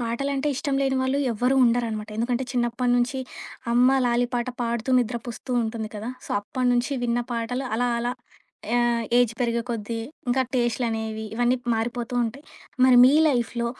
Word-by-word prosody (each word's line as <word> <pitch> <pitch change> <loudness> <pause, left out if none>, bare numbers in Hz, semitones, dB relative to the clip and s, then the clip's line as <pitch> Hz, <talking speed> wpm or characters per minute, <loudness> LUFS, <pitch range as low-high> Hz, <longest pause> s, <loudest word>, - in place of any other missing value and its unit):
పాటలంటే, 275 +5 -1
ఇష్టం 275 +2 -2
లేని 270 -1 +1
వాళ్ళు 260 +2 0
ఎవ్వరూ 250 +4 +1
ఉండరనమాట, 230 -3 0
ఎందుకంటే 240 +3 -1
చిన్నప్పటి 245 0 0
నుంచి 245 +2 0 0.5
అమ్మ 250 +3 +5
లాలీ 240 0 +2
పాట 240 +1 -1
పాడుతూ 235 +1 -2
నిద్రపుస్తూ 240 +1 -4
ఉంటుంది 220 -1 -4
కదా! 210 +2 -5 0.2
సో, - - -12
అప్పటినుంచి 245 +4 0
విన్న 240 0 +1
పాటలు 240 +3 -2
అలా 245 +1 +1
అలా 240 +1 -1 0.6
ఆ! - - +4 0.4
ఏజ్ 245 -2 +4
పెరిగే 235 -1 +1
కొద్దీ, 230 0 -3 0.3
ఇంకా 260 +2 +3
టేస్ట్‌లనేవి 225 -2 -1
ఇవన్నీ 245 +2 +2 0.2
మారిపోతూ 235 +2 -3
ఉంటాయి. 245 +5 -6 0.4
మరి 255 -1 +6
మీ 260 - +6
లైఫ్‌లో 240 -4 0
240 Hz, 150 wpm, -24 LUFS, 230-250 Hz, 0.6 s, మరి